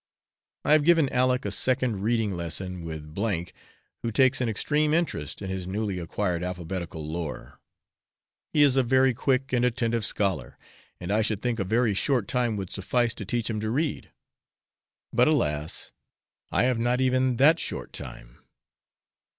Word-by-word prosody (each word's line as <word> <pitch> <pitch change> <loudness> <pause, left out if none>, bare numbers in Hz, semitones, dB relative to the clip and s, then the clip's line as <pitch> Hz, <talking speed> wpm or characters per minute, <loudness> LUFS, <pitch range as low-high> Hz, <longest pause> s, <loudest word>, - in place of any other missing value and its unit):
I - - +2
have 155 -1 +6
given 165 -3 +4
Aleck 125 -1 +2
a 100 - -2
second 125 -1 0
reading 110 -1 +1
lesson 90 +1 -4
with 80 -1 -7
S, 95 -5 -2 0.5
who 115 - -2
takes 130 +3 +3
an 120 - +1
extreme 150 +8 +1
interest 100 - -2
in 95 - -4
his 95 -1 -4
newly 100 -1 -2
acquired 85 +1 -2
alphabetical 90 -2 -5
lore. 80 -1 -6 0.9
He 150 - +4
is 140 -3 +4
a 135 - +5
very 130 +1 +3
quick 135 +1 0
and 120 -1 +2
attentive 115 -2 0
scholar, 95 - 0 0.4
and 90 +2 -4
I 110 +2 +3
should 110 -1 -2
think 120 -2 -1
a - - +1
very 110 +3 +1
short 120 +1 0
time 120 -3 0
would 95 -3 -5
suffice 115 +4 0
to 105 - -7
teach 115 +3 -1
him 110 -2 -2
to 110 +1 -2
read; 145 +6 -2 1.0
but, - - +4
alas! 75 +1 0 0.6
I - - +3
have 125 -2 +1
not 120 +2 +1
even 130 -1 +2
that 155 +7 +5
short - - -5
time. - - -9
110 Hz, 165 wpm, -26 LUFS, 95-130 Hz, 1.0 s, have